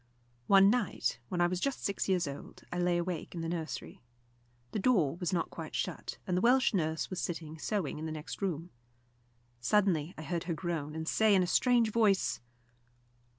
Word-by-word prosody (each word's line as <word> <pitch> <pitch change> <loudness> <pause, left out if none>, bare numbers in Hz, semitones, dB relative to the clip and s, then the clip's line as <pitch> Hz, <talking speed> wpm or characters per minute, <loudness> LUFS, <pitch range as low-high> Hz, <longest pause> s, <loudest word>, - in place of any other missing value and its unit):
One 195 0 +7
night, 245 - 0
when 175 - -1
I - - +5
was 175 +1 0
just 275 +6 -2
six 200 0 -1
years 180 -4 +2
old, 140 0 -8
I 175 - -2
lay 175 0 +2
awake 175 0 -3
in 170 - -3
the 165 - -3
nursery. 165 -2 -5 0.7
The - - -2
door 190 - +3
was 180 -2 -2
not 175 -3 -1
quite - - -7
shut, - - -3
and 180 - -1
the 180 - +1
Welsh 255 +2 +4
nurse 160 -3 -1
was 185 - -2
sitting 160 -2 -5
sewing 185 -6 -2
in 160 - -4
the - - -4
next 155 +5 -7
room. 175 -3 -2 0.9
Suddenly 175 +2 +2
I 155 - -6
heard 170 0 -3
her 170 -2 -1
groan, 160 -3 -3
and 160 0 -4
say 220 +1 +4
in 185 - +4
a - - +1
strange 235 +4 +3
voice. 210 -4 +2
175 Hz, 195 wpm, -32 LUFS, 160-200 Hz, 0.9 s, One